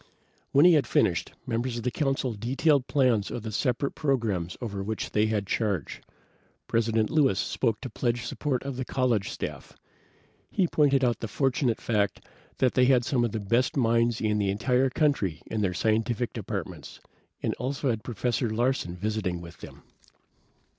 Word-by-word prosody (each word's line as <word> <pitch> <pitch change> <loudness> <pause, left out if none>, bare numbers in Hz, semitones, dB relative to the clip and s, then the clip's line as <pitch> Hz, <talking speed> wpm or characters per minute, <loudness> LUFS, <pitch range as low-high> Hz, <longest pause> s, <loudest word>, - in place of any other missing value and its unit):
When 140 +4 +6
he 180 - +8
had 145 -7 +3
finished, - - +1
members 120 +1 -2
of 115 - -5
the 125 - 0
Council 135 -3 -1
detailed 130 +5 +1
plans 125 -8 +2
of 115 - -5
the 110 - -4
separate 125 +5 0
programs 115 - -1
over 100 -5 -4
which 110 +2 -4
they 105 +1 +2
had 105 -2 -1
charge. 100 - -2 0.6
President 115 -1 +1
Lewis 140 -10 +3
spoke 115 -4 0
to 130 - -5
pledge 120 -1 -1
support 130 +1 -2
of 135 -2 -5
the 130 - -2
college 125 -6 0
staff. - - -6 0.8
He 185 - +1
pointed 140 -4 +3
out 120 -2 +2
the 115 - -4
fortunate 130 0 0
fact 105 -4 0 0.4
that 130 -2 +2
they 125 - +4
had 125 -2 +4
some 125 -1 +1
of 120 - 0
the 110 - -2
best 115 +7 +1
minds 115 -2 +2
in 105 -1 +1
the 100 -1 +1
entire 125 +6 +2
country 125 - 0
in 110 -1 -3
their 90 -3 0
scientific 110 +3 0
departments, - - -6 0.4
and - - 0
also 135 +1 -1
had 110 -2 -4
Professor 120 +1 -1
Larsen 115 -5 0
visiting 100 -2 -2
with 85 0 -11
them. - - -12
120 Hz, 170 wpm, -27 LUFS, 105-130 Hz, 0.8 s, he